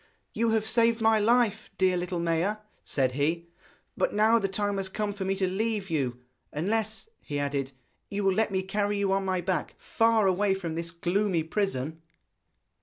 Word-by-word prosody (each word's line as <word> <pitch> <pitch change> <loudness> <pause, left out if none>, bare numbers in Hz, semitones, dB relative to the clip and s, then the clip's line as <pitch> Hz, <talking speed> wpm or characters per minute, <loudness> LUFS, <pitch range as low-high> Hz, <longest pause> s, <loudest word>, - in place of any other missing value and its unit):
'You 230 0 +1
have 220 -1 +1
saved 230 0 +3
my 220 -1 +4
life, 225 -1 +2
dear 185 -1 +3
little 180 0 -2
Maia,' 170 +5 0 0.3
said 130 -3 0
he; 160 +5 -1 0.5
'but - - 0
now 220 +2 +5
the 200 - 0
time 205 +1 -1
has 190 -1 -2
come 205 +1 -2
for 195 -1 -4
me 195 +1 0
to 190 -1 0
leave 200 0 -2
you 125 -6 -1 0.3
unless,' 220 - -1
he 145 - -5
added, 140 -1 -2 0.4
'you 205 0 -2
will 195 -1 +3
let 220 +3 +1
me 190 -2 -1
carry 205 +1 -1
you 200 -1 +1
on 195 0 +1
my 185 -1 0
back 185 +1 -2
far 225 -2 +2
away 195 +1 +2
from 175 -4 -4
this 165 +1 -4
gloomy 175 +1 0
prison.' 160 -4 -2
195 Hz, 185 wpm, -28 LUFS, 170-215 Hz, 0.5 s, now